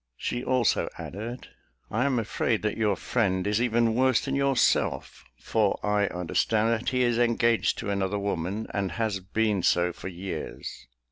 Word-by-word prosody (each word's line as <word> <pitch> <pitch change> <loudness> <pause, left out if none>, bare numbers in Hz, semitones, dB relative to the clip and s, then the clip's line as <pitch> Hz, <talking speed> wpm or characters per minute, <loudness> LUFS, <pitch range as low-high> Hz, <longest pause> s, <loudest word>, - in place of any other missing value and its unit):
She 120 +1 -3
also 130 -4 +1
added, 115 +6 -7 0.4
"I 120 +5 +1
am 135 -3 +1
afraid 115 0 0
that 105 - 0
your 105 -3 +1
friend 95 -6 0
is 105 +2 +1
even 115 -1 +2
worse 130 +1 +3
than 135 - -2
yourself; 140 -1 +1 0.2
for 105 -3 +1
I 105 -1 +2
understand 105 +6 0
that 115 0 0
he 125 -1 +1
is 120 -1 +2
engaged 115 -1 +2
to 100 - -3
another 100 0 -1
woman, 100 +1 -2
and 100 -2 -1
has 110 -4 -1
been 105 +1 0
so 90 0 +2
for - - -8
years. 95 -8 -6
110 Hz, 160 wpm, -27 LUFS, 100-120 Hz, 0.4 s, worse